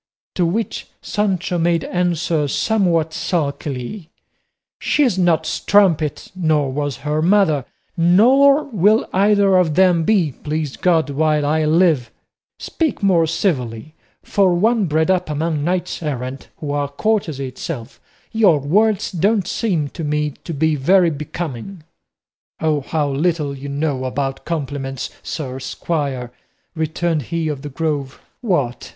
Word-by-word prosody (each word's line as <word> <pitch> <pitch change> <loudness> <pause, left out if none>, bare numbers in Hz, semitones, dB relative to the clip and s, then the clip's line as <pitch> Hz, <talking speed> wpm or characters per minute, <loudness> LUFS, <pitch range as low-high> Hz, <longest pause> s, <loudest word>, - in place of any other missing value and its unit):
To 175 -2 +1
which 215 +6 -3 0.2
Sancho 185 -4 -1
made 165 -1 +1
answer, 170 -4 0
somewhat 170 - +1
sulkily, 150 - -3 0.7
"She's 275 -9 +2
no 175 -3 +3
strumpet, 165 -3 +1
nor 155 -6 +1
was 145 -2 -2
her 150 +1 0
mother, 165 -7 +3 0.3
nor 255 - +5
will 215 - +2
either 200 0 +4
of 165 -5 +2
them 180 -2 +4
be, 180 -5 +2
please 150 +1 -4
God, 165 -6 +1
while 150 0 +1
I 155 +1 +1
live; 155 -5 +3 0.5
speak 315 -9 -2
more 175 -4 +3
civilly; 145 - -2 0.3
for 190 -3 +2
one 215 +2 +2
bred 160 +3 +2
up 180 -3 0
among 155 0 -1
knights 180 +2 -2
errant, 135 -3 -4
who 145 -2 -5
are 145 -1 -1
courtesy 155 -4 -1
itself, 130 -1 -7 0.3
your 210 -8 +4
words 200 +8 +1
don't 195 +3 +1
seem 180 -12 -1
to 165 - -7
me 150 0 0
to - - -5
be 160 +2 +2
very 175 +5 +3
becoming." 155 +2 -6 0.8
"O 155 -2 +1
how 150 +2 -1
little 145 0 -1
you 140 +1 -7
know 140 -2 -2
about 135 +1 -3
compliments, 140 -5 -4
sir 130 -4 -5
squire," 135 -3 -3 0.4
returned 160 0 -1
he 165 +4 -3
of 145 -3 -3
the 145 - -6
Grove. 145 -2 -3 0.2
"What! 140 - -1
160 Hz, 135 wpm, -19 LUFS, 145-185 Hz, 0.8 s, nor